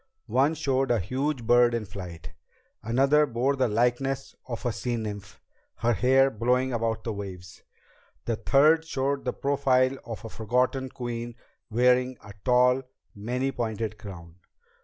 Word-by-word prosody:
One 130 Hz, +7 st, +2 dB
showed 135 Hz, -4 st, 0 dB
a 120 Hz, -, +3 dB
huge 130 Hz, -, -2 dB
bird 120 Hz, +1 st, +4 dB
in 115 Hz, -2 st, -2 dB
flight. 90 Hz, -5 st, -9 dB, 0.5 s
Another 135 Hz, +7 st, +3 dB
bore 130 Hz, +3 st, 0 dB
the 130 Hz, -2 st, +2 dB
likeness 125 Hz, +4 st, 0 dB
of 120 Hz, -1 st, -6 dB
a 120 Hz, -, +1 dB
sea 120 Hz, +2 st, -3 dB
nymph, 105 Hz, -3 st, -6 dB, 0.4 s
her 120 Hz, +1 st, +1 dB
hair 130 Hz, +6 st, +4 dB
blowing 125 Hz, +3 st, +1 dB
above 115 Hz, -1 st, -1 dB
the 115 Hz, -, -3 dB
waves. 95 Hz, -3 st, -8 dB, 0.6 s
A 115 Hz, -, 0 dB
third 145 Hz, +8 st, +4 dB
showed 140 Hz, -3 st, -2 dB
the 125 Hz, -, -1 dB
profile 135 Hz, -2 st, +1 dB
of 115 Hz, -1 st, -7 dB
a -, -, -6 dB
forgotten 125 Hz, +4 st, 0 dB
queen 120 Hz, -2 st, -5 dB, 0.3 s
wearing 125 Hz, +2 st, +2 dB
a 105 Hz, -, -11 dB
tall, 125 Hz, +1 st, +4 dB, 0.3 s
many 125 Hz, +6 st, -2 dB
pointed 110 Hz, -3 st, -3 dB
crown. 85 Hz, -5 st, -10 dB
120 Hz, 145 wpm, -27 LUFS, 110-135 Hz, 0.6 s, bird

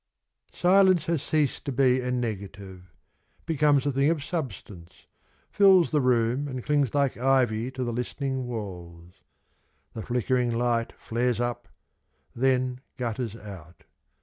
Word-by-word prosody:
Silence 185 Hz, -2 st, +4 dB
has 165 Hz, -4 st, 0 dB
ceased 155 Hz, -3 st, 0 dB
to 140 Hz, -, -3 dB
be 130 Hz, -1 st, +3 dB
a 125 Hz, -, -3 dB
negative, 100 Hz, -6 st, -5 dB, 0.5 s
Becomes 145 Hz, -4 st, +2 dB
a 145 Hz, -, +1 dB
thing 140 Hz, +2 st, +2 dB
of 160 Hz, -3 st, -1 dB
substance 105 Hz, -, -7 dB, 0.2 s
— -, -, -38 dB
fills 190 Hz, -4 st, +5 dB
the 150 Hz, -2 st, +2 dB
room 125 Hz, +2 st, +1 dB
And 130 Hz, -3 st, -5 dB
clings 145 Hz, -5 st, +1 dB
like 140 Hz, -2 st, +1 dB
ivy 125 Hz, -2 st, +1 dB
to 130 Hz, -1 st, -5 dB
the 120 Hz, -1 st, -3 dB
listening 130 Hz, +2 st, -3 dB
walls. 90 Hz, -6 st, -8 dB, 0.8 s
The 110 Hz, -, -6 dB
flickering 125 Hz, +1 st, 0 dB
light 120 Hz, -1 st, 0 dB
flares 120 Hz, 0 st, -1 dB
up 120 Hz, 0 st, -3 dB, 0.4 s
— -, -, -43 dB
then 130 Hz, -1 st, +1 dB, 0.2 s
gutters 115 Hz, -2 st, -3 dB
out. 95 Hz, -7 st, -12 dB
125 Hz, 140 wpm, -26 LUFS, 115-140 Hz, 0.8 s, fills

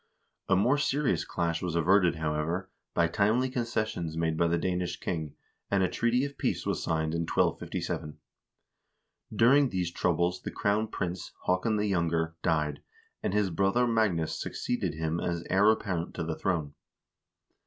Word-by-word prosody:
A 95 Hz, -, +5 dB
more 125 Hz, +10 st, +3 dB
serious 145 Hz, -1 st, +1 dB
clash 85 Hz, -1 st, -2 dB
was 85 Hz, -2 st, -2 dB
averted, 90 Hz, +1 st, +4 dB
however, 80 Hz, +4 st, -2 dB, 0.2 s
by 85 Hz, -, +4 dB
timely 110 Hz, +8 st, +1 dB
concessions 110 Hz, -9 st, -2 dB
made 80 Hz, -1 st, 0 dB
by 85 Hz, +1 st, +2 dB
the 85 Hz, +1 st, +1 dB
Danish 90 Hz, 0 st, -2 dB
king, 80 Hz, -4 st, -3 dB, 0.3 s
and 100 Hz, -1 st, +2 dB
a -, -, +3 dB
treaty 120 Hz, +8 st, +1 dB
of 140 Hz, 0 st, -8 dB
peace -, -, -1 dB
was -, -, -1 dB
signed 80 Hz, -1 st, -1 dB
in 85 Hz, -, 0 dB
1257. 75 Hz, -2 st, -1 dB, 1.1 s
During 135 Hz, +4 st, +5 dB
these 90 Hz, -4 st, -2 dB
troubles 85 Hz, +1 st, 0 dB
the -, -, -5 dB
crown 105 Hz, +2 st, 0 dB
prince, 90 Hz, -4 st, -4 dB
Haakon 95 Hz, +5 st, +1 dB
the 105 Hz, -, +1 dB
Younger,1 85 Hz, -4 st, 0 dB
died, 75 Hz, -3 st, 0 dB, 0.4 s
and 100 Hz, -, -1 dB
his 105 Hz, -3 st, +2 dB
brother 100 Hz, +8 st, +2 dB
Magnus 110 Hz, -9 st, +1 dB
succeeded 95 Hz, -10 st, -2 dB
him 80 Hz, +1 st, -1 dB
as 85 Hz, -1 st, -2 dB
heir 100 Hz, +3 st, +5 dB
apparent 95 Hz, -6 st, -1 dB
to -, -, -2 dB
the 80 Hz, 0 st, -3 dB
throne. 80 Hz, -6 st, -1 dB
90 Hz, 155 wpm, -29 LUFS, 80-105 Hz, 1.1 s, A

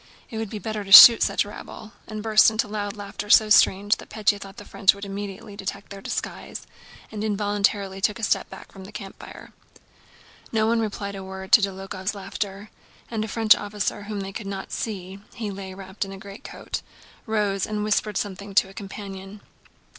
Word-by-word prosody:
It 220 Hz, -, -4 dB
would 220 Hz, -2 st, -4 dB
be 215 Hz, -, -5 dB
better 215 Hz, +1 st, -4 dB
to 195 Hz, -, -10 dB
shoot 230 Hz, +4 st, +12 dB
such -, -, +2 dB
rabble," 210 Hz, +1 st, -10 dB, 0.2 s
and 215 Hz, -1 st, -6 dB
burst 215 Hz, -1 st, +6 dB
into 220 Hz, 0 st, -1 dB
loud 205 Hz, 0 st, -4 dB
laughter, 205 Hz, 0 st, -7 dB
so 215 Hz, 0 st, +6 dB
strange 205 Hz, 0 st, +5 dB
that -, -, -13 dB
Pétya 210 Hz, -1 st, +1 dB
thought 195 Hz, 0 st, -10 dB
the 205 Hz, -, -10 dB
French 195 Hz, 0 st, +3 dB
would 200 Hz, 0 st, -8 dB
immediately 200 Hz, +1 st, -7 dB
detect 200 Hz, 0 st, -6 dB
their 200 Hz, 0 st, -8 dB
disguise, -, -, -5 dB, 0.5 s
and 215 Hz, -1 st, -5 dB
involuntarily 205 Hz, -2 st, 0 dB
took 210 Hz, +2 st, +1 dB
a 230 Hz, -, -9 dB
step -, -, +1 dB
back -, -, -12 dB
from 190 Hz, -1 st, -11 dB
the 200 Hz, -, -11 dB
campfire. 200 Hz, -2 st, -10 dB, 1.0 s
No 220 Hz, -1 st, +2 dB
one 230 Hz, +1 st, +2 dB
replied 205 Hz, -2 st, -3 dB
a 195 Hz, -1 st, -7 dB
word 190 Hz, +1 st, -8 dB
to 220 Hz, -, +8 dB
Dólokhov's 195 Hz, 0 st, -3 dB
laughter, 200 Hz, +1 st, -6 dB, 0.4 s
and 220 Hz, -2 st, -1 dB
a -, -, -4 dB
French 220 Hz, 0 st, +5 dB
officer 205 Hz, 0 st, -3 dB
whom 205 Hz, -1 st, -4 dB
they 195 Hz, 0 st, -6 dB
could 210 Hz, -1 st, -6 dB
not 195 Hz, -1 st, -6 dB
see 195 Hz, -3 st, -5 dB, 0.2 s
(he 220 Hz, -4 st, -4 dB
lay 190 Hz, -1 st, -7 dB
wrapped 190 Hz, +1 st, -5 dB
in 195 Hz, -, -8 dB
a 195 Hz, -, -8 dB
greatcoat) 200 Hz, +1 st, -7 dB, 0.5 s
rose 205 Hz, -3 st, 0 dB
and 210 Hz, -1 st, -3 dB
whispered 210 Hz, -1 st, 0 dB
something 200 Hz, 0 st, -5 dB
to 190 Hz, -, +4 dB
a -, -, -14 dB
companion. 195 Hz, 0 st, -8 dB
205 Hz, 190 wpm, -24 LUFS, 195-215 Hz, 1.0 s, shoot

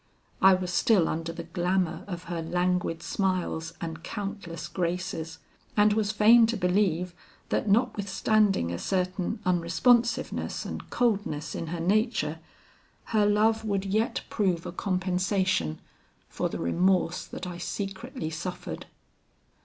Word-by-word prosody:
I 190 Hz, 0 st, +8 dB
was 180 Hz, -1 st, -3 dB
still 185 Hz, -2 st, +4 dB
under 165 Hz, +1 st, -2 dB
the 170 Hz, 0 st, -6 dB
glamour 175 Hz, +1 st, -1 dB
of 175 Hz, -3 st, -5 dB
her 170 Hz, -1 st, -4 dB
languid 175 Hz, 0 st, 0 dB
smiles 180 Hz, -4 st, -1 dB
and 165 Hz, -1 st, -5 dB
countless 195 Hz, -5 st, -5 dB
graces, 175 Hz, -2 st, -3 dB, 0.4 s
and 210 Hz, 0 st, +5 dB
was 210 Hz, -1 st, +1 dB
fain 225 Hz, +2 st, +6 dB
to 230 Hz, 0 st, -1 dB
believe 180 Hz, -2 st, +1 dB, 0.4 s
that 215 Hz, -, 0 dB
notwithstanding 200 Hz, -, +2 dB
a 85 Hz, -, -3 dB
certain 185 Hz, -, -1 dB
unresponsiveness 225 Hz, +8 st, +2 dB
and -, -, -6 dB
coldness 205 Hz, -11 st, 0 dB
in 165 Hz, -, -4 dB
her 170 Hz, +1 st, -4 dB
nature, 215 Hz, +8 st, +1 dB, 0.7 s
her 210 Hz, -2 st, +4 dB
love 220 Hz, +2 st, +3 dB
would 200 Hz, -2 st, -1 dB
yet 215 Hz, +4 st, 0 dB
prove 185 Hz, -6 st, 0 dB
a -, -, -4 dB
compensation 185 Hz, -, 0 dB, 0.5 s
for -, -, -2 dB
the -, -, -4 dB
remorse 180 Hz, -, +1 dB
that -, -, -7 dB
I 175 Hz, -1 st, -6 dB
secretly 195 Hz, -, -4 dB
suffered. 175 Hz, +3 st, -5 dB
185 Hz, 130 wpm, -28 LUFS, 170-205 Hz, 0.7 s, I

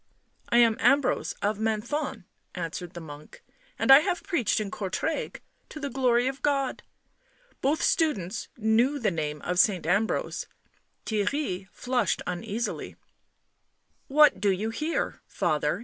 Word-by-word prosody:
" -, -, -42 dB
I 235 Hz, -, +3 dB
am 230 Hz, -2 st, +5 dB
Ambrose 280 Hz, +1 st, +2 dB
of 205 Hz, +1 st, 0 dB
Menthon," 225 Hz, +1 st, -2 dB, 0.3 s
answered 175 Hz, 0 st, -5 dB
the -, -, -5 dB
monk. 150 Hz, -2 st, -12 dB, 0.2 s
" -, -, -33 dB
And -, -, +3 dB
I 270 Hz, -, +11 dB
have 360 Hz, +2 st, -2 dB
preached 340 Hz, -, 0 dB
in 205 Hz, -2 st, -4 dB
Courtrai. 215 Hz, -, -3 dB, 0.3 s
To 305 Hz, -, -8 dB
the 280 Hz, -2 st, -4 dB
glory 245 Hz, -1 st, +2 dB
of 265 Hz, +1 st, -3 dB
God." 275 Hz, -3 st, 0 dB, 0.8 s
Both 285 Hz, +4 st, +1 dB
students 215 Hz, -, 0 dB
knew 230 Hz, +6 st, +2 dB
the 230 Hz, -7 st, 0 dB
name 150 Hz, -3 st, -3 dB
of 180 Hz, 0 st, -1 dB
Saint 190 Hz, -4 st, +3 dB
Ambrose. 200 Hz, +6 st, 0 dB, 0.6 s
Theirry 205 Hz, -3 st, -1 dB
flushed 245 Hz, -5 st, -1 dB
uneasily. 195 Hz, +6 st, -4 dB, 0.6 s
" -, -, -45 dB
What 300 Hz, -2 st, +6 dB
do 205 Hz, -, +3 dB
you 200 Hz, +4 st, 0 dB
here, 310 Hz, +8 st, -2 dB
father?" -, -, 0 dB
225 Hz, 145 wpm, -27 LUFS, 190-275 Hz, 0.8 s, I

